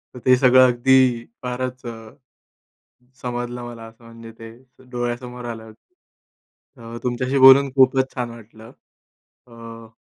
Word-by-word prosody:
तर -, -, -9 dB
ते 130 Hz, -, +5 dB
सगळं 130 Hz, 0 st, +5 dB
अगदी 125 Hz, -1 st, +2 dB, 0.2 s
फारच 125 Hz, +1 st, -5 dB
अ 120 Hz, -, -6 dB, 1.3 s
समजलं 120 Hz, 0 st, -5 dB
मला 120 Hz, -1 st, -10 dB
असं, 115 Hz, +1 st, -19 dB
म्हणजे 115 Hz, 0 st, -13 dB
ते 115 Hz, 0 st, -11 dB, 0.4 s
डोळ्यासमोर 120 Hz, 0 st, -6 dB
आलं. 110 Hz, -2 st, -9 dB, 1.0 s
अ, 115 Hz, 0 st, -10 dB
तुमच्याशी 125 Hz, +2 st, -2 dB
बोलून 135 Hz, +1 st, +7 dB
खूपच 130 Hz, 0 st, +3 dB
छान 120 Hz, -2 st, -4 dB
वाटलं. 110 Hz, -1 st, -15 dB, 0.8 s
अ 115 Hz, -1 st, -13 dB
120 Hz, 120 wpm, -20 LUFS, 115-130 Hz, 1.3 s, बोलून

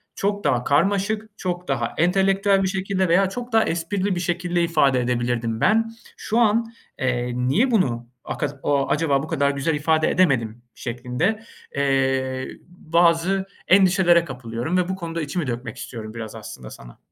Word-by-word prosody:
çok 205 Hz, +1 st, -1 dB
daha 125 Hz, -1 st, +1 dB
karmaşık, 200 Hz, -, +1 dB
çok 180 Hz, -1 st, -4 dB
daha 120 Hz, -4 st, -1 dB
entelektüel 195 Hz, +3 st, +3 dB
bir 190 Hz, -, +1 dB
şekilde 190 Hz, 0 st, -1 dB
veya 185 Hz, +3 st, +4 dB
çok 245 Hz, +4 st, -6 dB
daha 225 Hz, -, +5 dB
esprili 185 Hz, +3 st, -1 dB
bir -, -, -2 dB
şekilde 175 Hz, 0 st, -1 dB
ifade 140 Hz, -6 st, +3 dB
edebilirdim 120 Hz, -2 st, -1 dB
ben. 225 Hz, +3 st, +3 dB, 0.3 s
Şu 225 Hz, +2 st, -1 dB
an, 230 Hz, 0 st, +2 dB, 0.3 s
eee, 125 Hz, -2 st, -1 dB
niye 135 Hz, -, +2 dB
bunu 120 Hz, -, +1 dB, 0.2 s
aka -, -, -2 dB, 0.2 s
a 140 Hz, -1 st, +1 dB
acaba 145 Hz, -3 st, +1 dB
bu -, -, -6 dB
kadar 140 Hz, -1 st, +1 dB
güzel 140 Hz, +3 st, -1 dB
ifade 155 Hz, +1 st, +2 dB
edemedim 120 Hz, -10 st, +1 dB
şeklinde, 125 Hz, -, -2 dB, 0.3 s
eee, 135 Hz, -1 st, 0 dB, 0.2 s
bazı 175 Hz, +2 st, +1 dB, 0.2 s
endişelere 185 Hz, -3 st, +5 dB
kapılıyorum 125 Hz, +4 st, -3 dB
ve 180 Hz, 0 st, 0 dB
bu 190 Hz, -, -1 dB
konuda 170 Hz, -2 st, -5 dB
içimi 155 Hz, 0 st, -3 dB
dökmek 120 Hz, 0 st, -5 dB
istiyorum 110 Hz, -3 st, -7 dB
biraz 110 Hz, -1 st, -7 dB
aslında -, -, -9 dB
sana. -, -, -13 dB
165 Hz, 155 wpm, -23 LUFS, 130-190 Hz, 0.3 s, daha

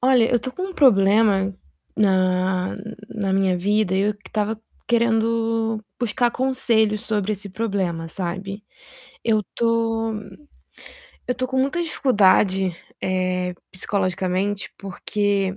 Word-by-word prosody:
Olha, 250 Hz, -2 st, +4 dB
eu 245 Hz, -, +3 dB
tô 255 Hz, -, -4 dB
com 370 Hz, -, -6 dB
um 380 Hz, -1 st, -6 dB
problema 200 Hz, -, +4 dB, 0.4 s
na 185 Hz, -2 st, +2 dB, 0.3 s
na 200 Hz, -3 st, -2 dB
minha 190 Hz, -1 st, +2 dB
vida, 205 Hz, +1 st, +1 dB
e 190 Hz, -, +2 dB
eu 210 Hz, +1 st, +1 dB
que 205 Hz, -1 st, -16 dB
estava 215 Hz, +1 st, -2 dB, 0.3 s
querendo 225 Hz, -1 st, +1 dB, 0.2 s
buscar 240 Hz, 0 st, +1 dB
conselhos 230 Hz, -4 st, +2 dB
sobre 215 Hz, -3 st, 0 dB
esse 200 Hz, 0 st, -4 dB
problema, 190 Hz, -6 st, -2 dB
sabe, 195 Hz, +4 st, -4 dB, 0.6 s
eu 215 Hz, -2 st, +2 dB
tô 225 Hz, -1 st, +1 dB, 1.1 s
eu 250 Hz, -, 0 dB
tô 255 Hz, +1 st, -2 dB
com 260 Hz, 0 st, -1 dB
muita 275 Hz, +7 st, +1 dB
dificuldade, 195 Hz, -, +3 dB, 0.3 s
eh, 185 Hz, -1 st, -1 dB, 0.2 s
psicologicamente, 190 Hz, +1 st, -2 dB
porque 195 Hz, 0 st, -1 dB
205 Hz, 120 wpm, -22 LUFS, 190-230 Hz, 1.1 s, Olha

